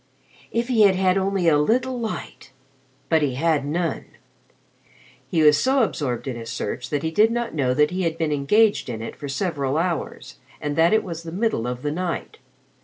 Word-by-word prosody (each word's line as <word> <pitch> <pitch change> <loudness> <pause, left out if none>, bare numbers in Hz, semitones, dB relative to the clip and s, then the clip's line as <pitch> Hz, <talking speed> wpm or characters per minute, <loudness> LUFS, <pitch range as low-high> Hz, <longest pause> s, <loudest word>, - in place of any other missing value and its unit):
If 235 +1 -1
he 240 -4 +2
had 200 -2 +6
had 185 0 +2
only 190 -2 0
a 150 -3 +5
little 245 +10 +1
light, 225 -2 -6 0.6
but 160 -1 +3
he 135 -4 0
had 155 0 +1
none. 165 0 -2 1.2
He 160 -3 +2
was 150 -1 +6
so 265 -1 +3
absorbed 135 - -2
in 130 - -3
his 115 -1 -7
search 125 - -4
that 145 0 -2
he 160 - -1
did 210 +7 +4
not 235 0 -2
know 130 -5 0
he 150 +6 +2
had 165 -2 -1
been 160 -2 -1
engaged 205 - +2
in 115 -2 -5
it - - -7
for 145 - -7
several 140 -3 -1
hours, 170 0 -3 0.2
and 145 -1 -3
that 165 +2 +4
it 220 - +3
was 170 -3 -6
the 165 -1 -8
middle 185 - -1
of 125 0 -5
the 145 - -1
night. 175 +1 -4
165 Hz, 195 wpm, -23 LUFS, 145-195 Hz, 1.2 s, had